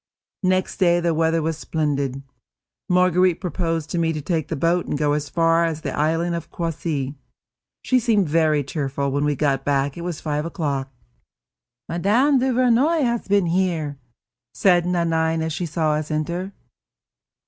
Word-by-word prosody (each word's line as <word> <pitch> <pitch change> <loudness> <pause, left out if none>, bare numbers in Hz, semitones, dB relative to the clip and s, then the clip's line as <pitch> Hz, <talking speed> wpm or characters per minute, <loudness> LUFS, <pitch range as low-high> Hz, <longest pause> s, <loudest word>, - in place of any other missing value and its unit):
Next 185 -1 0
day 175 -2 +3
the 170 -1 +1
weather 160 0 +1
was 160 0 -2
splendid. 140 -4 -2 0.7
Marguerite 180 -1 +3
proposed 165 -4 -2
to 175 - -1
me 165 -1 +1
to 155 - -3
take 160 0 -2
the - - -3
boat 170 +5 +1
and - - -2
go 145 0 +1
as 145 -1 -2
far 165 +1 +3
as 160 -2 -2
the - - -4
island 165 +3 0
of 170 -2 -5
Croissy. 155 -5 -3 0.7
She 255 - +3
seemed 215 -6 +2
very 155 -1 +2
cheerful; 140 -1 -2
when 145 +2 0
we 150 -1 +1
got 135 -2 0
back 140 0 0
it - - -6
was 170 -3 -4
five 150 -1 -2
o'clock. 145 -5 -3 1.0
"Mme. 230 - +2
Duvernoy 255 +5 +2
has 235 -2 -1
been 200 -1 +3
here," 165 -5 -1 0.6
said 175 -3 +3
Nanine, 165 -2 +1
as 160 -1 -2
she 175 +1 -3
saw 160 -1 0
us 150 0 -2
enter. 170 +5 -2
165 Hz, 160 wpm, -22 LUFS, 150-180 Hz, 1.0 s, day